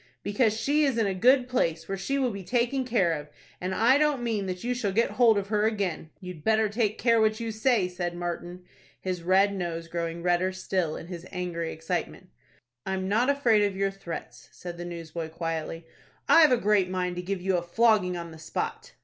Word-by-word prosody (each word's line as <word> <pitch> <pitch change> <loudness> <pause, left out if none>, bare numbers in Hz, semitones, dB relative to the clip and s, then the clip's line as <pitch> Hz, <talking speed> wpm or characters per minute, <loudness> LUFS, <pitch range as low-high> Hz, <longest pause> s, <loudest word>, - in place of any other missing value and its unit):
"Because 215 +1 +1
she 295 +4 +2
is 270 -5 +1
in 225 - +2
a 195 - 0
good 250 +6 +4
place, 165 -10 -1
where 195 - -2
she 195 +9 -2
will 260 -3 +1
be 200 -2 -7
taken 245 +6 0
care 200 -9 +2
of, 150 -1 -6 0.3
and 185 +1 -2
I 255 +5 +4
don't 295 -4 +1
mean 215 -4 -1
that 180 -1 -5
you 245 +1 0
shall 230 -5 -1
get 230 +5 +1
hold 230 -4 +4
of 200 0 -2
her 210 0 +2
again." 195 -7 -2
"You'd 180 -5 -9
better 220 0 +3
take 215 0 0
care 230 -2 +3
what 215 +1 +2
you 230 -1 -3
say," 220 -3 +2
said 175 -1 -4
Martin, 175 +1 -5 0.4
his 185 -2 -3
red 190 +3 +3
nose 170 -3 -4
growing 170 0 -4
redder 180 +1 +1
still, 185 -3 -1
in - - -7
his 175 0 -8
angry 175 -3 -3
excitement. 160 +1 -4 0.5
"I'm 190 0 -2
not 230 +7 +2
afraid 245 -7 +3
of 200 -2 0
your 195 0 +1
threats," 195 -4 -8
said 175 -1 -8
the 175 - -5
newsboy, 165 -1 -6
quietly. 165 0 -4 0.4
"I've 315 -4 +7
a 250 - +5
great 205 -4 +2
mind 180 -1 -2
to - - -2
give 190 +1 -3
you 185 0 +1
a - - -1
flogging 185 0 +2
on 170 -1 -7
the 160 - -12
spot." 155 - -4
190 Hz, 210 wpm, -27 LUFS, 175-225 Hz, 0.5 s, I've